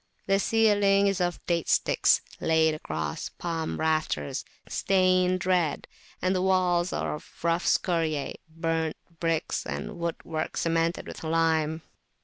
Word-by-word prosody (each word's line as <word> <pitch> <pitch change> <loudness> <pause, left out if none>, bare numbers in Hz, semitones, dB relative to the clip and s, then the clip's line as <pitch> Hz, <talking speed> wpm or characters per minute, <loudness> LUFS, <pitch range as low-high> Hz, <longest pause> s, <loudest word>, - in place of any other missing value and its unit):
The 195 0 +2
ceiling 205 -2 +3
is 195 -2 +1
of 175 -1 -2
date 170 -2 0
sticks - - +3 0.2
laid 160 -1 +3
across 80 - -4
palm 165 -2 -4
rafters 155 - 0 0.2
stained 185 -1 +2
red, 180 -5 +1 0.4
and 185 +1 +2
the 185 - +1
walls 185 -1 +2
are - - -2
of 150 - -9
rough 170 +1 +1
scoriae, 160 -5 +1 0.2
burnt 165 -1 -2 0.2
bricks, 165 -1 -1
and 70 - -5
wood 170 -1 -1
work 160 -1 -3
cemented 165 +1 0
with - - -9
lime. 160 -1 +1
165 Hz, 130 wpm, -27 LUFS, 160-185 Hz, 0.4 s, ceiling